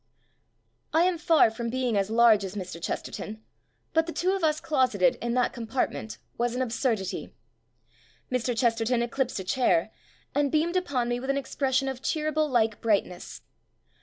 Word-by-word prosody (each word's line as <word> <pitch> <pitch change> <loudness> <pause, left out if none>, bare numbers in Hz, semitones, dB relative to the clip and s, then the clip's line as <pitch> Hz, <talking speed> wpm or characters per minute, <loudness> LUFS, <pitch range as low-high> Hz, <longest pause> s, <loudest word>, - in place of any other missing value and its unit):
I 325 +2 +5
am 360 -2 +1
far 325 -9 +4
from 235 +1 -4
being 250 -2 -1
as 200 0 +1
large 225 -2 +5
as 190 +1 -6
Mr. 180 -4 -6
Chesterton, 215 +5 -5 0.5
but 325 0 +2
the - - -3
two 365 +3 0
of 385 -2 -2
us 310 -1 +2
closeted 255 - +2
in 235 0 -1
that 250 -1 +1
compartment 230 -1 -3 0.2
was 240 0 0
an 255 - -1
absurdity. 230 -5 -2 1.0
Mr. 250 -1 -1
Chesterton 235 0 +2
eclipsed 250 -1 -2
a - - -4
chair, 190 -3 +1 0.4
and 285 -1 +1
beamed 325 +3 +1
upon 280 -10 0
me 240 0 -1
with 265 +2 -6
an 275 - +2
expression 270 -1 0
of 265 -1 -4
Cheeryble 310 0 0
like 225 -4 +1
brightness. 200 -5 -1
245 Hz, 165 wpm, -27 LUFS, 225-280 Hz, 1.0 s, I